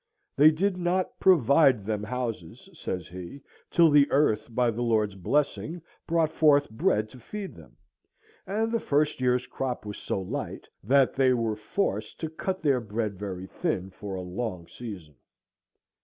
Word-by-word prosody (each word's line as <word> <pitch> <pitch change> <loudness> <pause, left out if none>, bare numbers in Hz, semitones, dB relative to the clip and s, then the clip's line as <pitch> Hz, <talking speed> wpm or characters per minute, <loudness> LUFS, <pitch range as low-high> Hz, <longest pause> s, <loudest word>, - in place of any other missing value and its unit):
They 150 +3 +8
did 180 +4 0
not 180 +1 -1
"provide 140 - +5
them 105 -1 -1
houses," 115 - -5
says 90 - -5
he, 90 +10 -9 0.3
"till 165 -2 +5
the 145 -1 +5
earth, 110 -7 +2
by 120 0 +1
the 115 +2 -4
Lord's 110 -4 +1
blessing, 145 - -1 0.3
brought 165 -2 +2
forth 145 -5 +4
bread 110 -1 +1
to 130 - -13
feed 200 - -7
them," - - -16 0.7
and 220 +3 0
the 230 - +1
first 150 -5 0
year's 125 0 +2
crop 130 -3 -4
was 105 -1 -6
so - - -2
light 95 - -5 0.2
that 135 +5 +4
"they 130 -1 +3
were 115 -2 -1
forced 110 - -2
to 160 -1 -3
cut 185 +3 -4
their 135 -4 +3
bread 105 -2 -3
very 95 -2 -5
thin 95 - -3
for 100 +1 -7
a 95 - -4
long 90 -1 -4
season." 90 - -9
125 Hz, 160 wpm, -27 LUFS, 105-155 Hz, 0.7 s, They